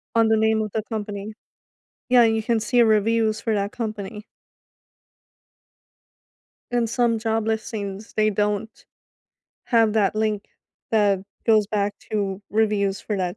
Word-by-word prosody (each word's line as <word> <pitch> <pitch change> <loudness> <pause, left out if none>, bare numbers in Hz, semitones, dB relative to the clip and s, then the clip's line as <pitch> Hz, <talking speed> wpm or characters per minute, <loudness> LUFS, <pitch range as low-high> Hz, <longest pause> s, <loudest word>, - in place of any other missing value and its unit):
on 225 -1 +4
the 220 0 +3
name 220 0 +2
of 215 -1 -4
the 220 - -1
company. 210 -1 -5 0.7
Yeah, 245 -1 +6
you 225 -1 +2
can 225 0 0
see 245 +2 +3
reviews 220 0 +2
for 225 - -1
that 200 0 -1
company. 215 -2 -5 2.5
And 240 -2 +1
some 235 -1 +1
job 225 0 -1
listings, 215 -2 -4
they 215 0 +2
don't 210 +1 -2 0.8
have 225 -3 +3
that 210 -2 +2
link 215 -1 -1 0.5
that 205 -3 +3 0.3
goes 215 -3 +4
back 205 -1 -1 0.2
to 200 -2 -2
reviews 205 -2 +1
for 210 - -3
that 180 0 -2
215 Hz, 135 wpm, -23 LUFS, 205-225 Hz, 2.5 s, Yeah